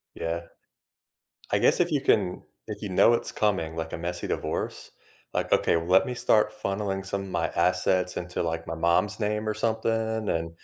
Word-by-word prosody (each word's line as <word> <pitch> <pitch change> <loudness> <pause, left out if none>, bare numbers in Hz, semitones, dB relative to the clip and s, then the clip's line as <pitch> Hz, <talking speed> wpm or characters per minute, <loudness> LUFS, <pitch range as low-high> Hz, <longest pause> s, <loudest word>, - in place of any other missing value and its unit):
Yeah. 85 +1 -2 1.1
I - - +3
guess - - +3
if 175 -1 +3
you 145 -3 +1
can 95 -8 +1 0.2
if - - -7
you 100 - -4
know 115 +5 +5
it's - - -2
coming, 95 -7 0
like, 80 0 -4
a - - -4
messy 85 +1 -4
divorce, - - -3 0.4
like, - - -1
okay, - - +4
well 85 0 -2
let 95 +1 +5
me 125 - -3
start 105 -2 +3
funneling 95 -1 -2
some 100 0 -3
of 95 - -8
my 85 -2 -1
assets 90 0 +2
into, 90 0 -3
like, 80 0 -3
my 80 - -4
mom's 85 +6 +1
name 105 0 -1
or 105 - 0
something, 110 -1 -1
and 85 0 -1
95 Hz, 190 wpm, -27 LUFS, 85-105 Hz, 1.1 s, know